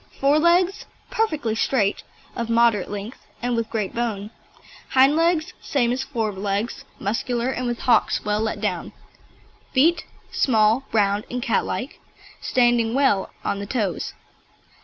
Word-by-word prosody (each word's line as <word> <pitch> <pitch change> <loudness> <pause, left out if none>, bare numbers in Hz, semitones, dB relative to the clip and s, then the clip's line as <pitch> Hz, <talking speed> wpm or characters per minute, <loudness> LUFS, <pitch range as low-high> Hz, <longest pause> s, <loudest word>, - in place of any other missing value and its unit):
FORE 280 +2 +4
LEGS 350 +4 +2 0.2
Perfectly 310 - 0
straight, 220 -2 +1 0.3
of 235 -1 -3
moderate 230 -4 +3
length, 205 +4 -6 0.2
and 245 0 -1
with 230 -1 -2
great 215 -4 -2
bone. 220 -3 -3 0.6
HIND 270 +3 +5
LEGS 330 -1 +1
Same 245 -4 +1
as 255 +2 -1
fore 235 -6 -2
legs, 200 +3 -3
muscular 235 +4 -1
and 255 -1 -3
with 240 -1 -2
hocks 245 - +2
well 210 0 +1
let 220 - -2
down. - - -3 0.8
FEET 320 +6 +3 0.3
Small, 225 +1 +3
round 205 -1 +1
and 250 - -3
catlike, 245 +3 -2 0.4
standing 240 -2 +2
well 265 -9 +2 0.2
on 200 - -1
the 200 - -5
toes. 205 -6 -2
235 Hz, 140 wpm, -23 LUFS, 215-265 Hz, 0.8 s, HIND